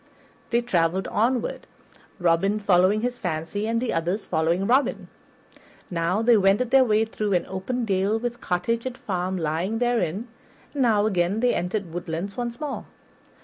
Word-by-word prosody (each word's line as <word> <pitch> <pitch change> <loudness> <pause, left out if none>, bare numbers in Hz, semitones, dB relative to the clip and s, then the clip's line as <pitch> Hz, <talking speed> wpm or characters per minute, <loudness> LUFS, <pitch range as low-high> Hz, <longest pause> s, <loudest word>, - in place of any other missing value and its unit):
They 235 0 +2
traveled 185 -5 0
onward, 240 +2 0 0.5
Robin 175 +4 +2
following 200 +1 +3
his 245 +1 -2
fancy 175 +4 -3
and 230 0 +1
the 250 0 -1
others 175 +6 -1
following 170 +3 0
Robin. 260 +6 +1 0.8
Now 175 +5 0
they 235 0 +6
wended 200 +5 +2
their 270 0 +7
way 220 -2 +2
through 215 -2 -2
an 175 - +1
open 230 +6 -3
dale 195 +1 +1
with 240 +1 -4
cottage 230 +7 -1
and 255 -1 -6
farm 185 -1 -2
lying 170 +6 -1
therein, 230 -4 0 0.5
and 285 - -2
now 215 -4 +3
again 190 0 +1
they 245 +1 +2
entered 180 0 -2
woodlands 175 +2 -4
once 240 -1 -4
more. 295 -2 -4
205 Hz, 155 wpm, -24 LUFS, 180-235 Hz, 0.8 s, their